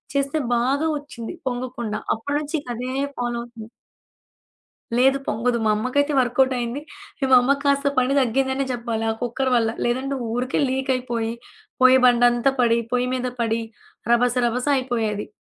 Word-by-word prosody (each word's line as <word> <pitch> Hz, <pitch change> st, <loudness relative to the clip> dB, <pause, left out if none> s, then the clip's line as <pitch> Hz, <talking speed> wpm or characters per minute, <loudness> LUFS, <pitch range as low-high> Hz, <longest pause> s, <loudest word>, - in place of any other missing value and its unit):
చేస్తే 280 Hz, +2 st, 0 dB, 0.2 s
బాగా 275 Hz, +6 st, +1 dB
ఒచ్చింది 285 Hz, 0 st, -8 dB
పొంగకుండా. 245 Hz, -3 st, -3 dB, 0.2 s
అప్పటినుంచి 290 Hz, +7 st, -2 dB
ఇక -, -, -22 dB
అదే 250 Hz, +2 st, -4 dB, 0.3 s
ఫాలో 240 Hz, -1 st, -2 dB
అవుతుంది. 235 Hz, -2 st, -11 dB, 1.3 s
లేదు 270 Hz, +2 st, +4 dB
పొంగదు. 235 Hz, +2 st, 0 dB
మా -, -, +4 dB
అమ్మకైతే 285 Hz, +6 st, 0 dB
వర్కౌటయింది. 250 Hz, 0 st, 0 dB, 0.4 s
ఈ -, -, +3 dB
మా 255 Hz, -, +8 dB
అమ్మక్కాస్త 280 Hz, +2 st, +2 dB
పని 255 Hz, +2 st, +2 dB
తగ్గిందనే 265 Hz, +2 st, 0 dB
చెప్పాలి. 235 Hz, -2 st, -3 dB
ఆ -, -, +1 dB
కుక్కర్ 260 Hz, +2 st, -1 dB
వల్ల. 225 Hz, -2 st, +2 dB, 0.2 s
లేదంటే 265 Hz, +3 st, -1 dB, 0.2 s
ఊరికే 250 Hz, +3 st, -1 dB
లీక్ 265 Hz, +1 st, -1 dB
అయిపోయి, 235 Hz, -3 st, -2 dB, 0.5 s
పోయ్య 255 Hz, 0 st, +8 dB
బండంతా 245 Hz, +1 st, +4 dB
పడి, 235 Hz, -1 st, +3 dB
పొయ్యి 250 Hz, 0 st, +1 dB
మీద 255 Hz, 0 st, -2 dB
పడి, 230 Hz, 0 st, 0 dB, 0.5 s
రబస 245 Hz, +1 st, +3 dB
రబస 245 Hz, +2 st, -2 dB
అయిపోయేది. 225 Hz, -5 st, -2 dB
250 Hz, 140 wpm, -22 LUFS, 235-270 Hz, 1.3 s, మా